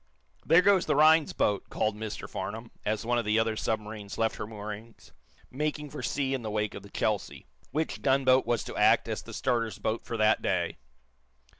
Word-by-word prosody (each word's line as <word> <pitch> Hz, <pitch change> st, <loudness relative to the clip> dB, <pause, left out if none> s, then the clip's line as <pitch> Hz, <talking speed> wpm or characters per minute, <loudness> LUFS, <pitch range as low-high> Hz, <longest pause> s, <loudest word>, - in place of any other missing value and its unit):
"There 165 Hz, +3 st, +5 dB
goes 195 Hz, -2 st, +4 dB
the -, -, +2 dB
Rhinds 155 Hz, +1 st, +5 dB
boats" 100 Hz, -1 st, 0 dB
called 110 Hz, -1 st, 0 dB
Mr 110 Hz, 0 st, -6 dB
Farnum, 115 Hz, +2 st, -6 dB
as 110 Hz, +1 st, -1 dB
one 120 Hz, +1 st, +2 dB
of -, -, -1 dB
the 105 Hz, +1 st, +1 dB
other 110 Hz, 0 st, +1 dB
submarines 105 Hz, -2 st, -4 dB
left 115 Hz, 0 st, 0 dB
her 105 Hz, -, -5 dB
moorings, 110 Hz, +1 st, -9 dB, 0.4 s
making 150 Hz, +1 st, -3 dB
for 150 Hz, -, -6 dB
sea 135 Hz, -2 st, -1 dB
in 130 Hz, -, -2 dB
the 110 Hz, -, -4 dB
wake 105 Hz, 0 st, -1 dB
of -, -, -7 dB
the 100 Hz, -, -13 dB
"Chelsea," 105 Hz, -1 st, -2 dB, 0.2 s
which 155 Hz, +1 st, -2 dB
gunboat 130 Hz, -1 st, +3 dB
was 120 Hz, -2 st, +1 dB
to -, -, -7 dB
act -, -, +4 dB
as -, -, -3 dB
the -, -, -11 dB
starter's 115 Hz, -5 st, -1 dB
boat 110 Hz, +2 st, -2 dB
for 115 Hz, -, -4 dB
that 110 Hz, 0 st, +3 dB
day. -, -, -1 dB
115 Hz, 195 wpm, -29 LUFS, 105-135 Hz, 0.4 s, There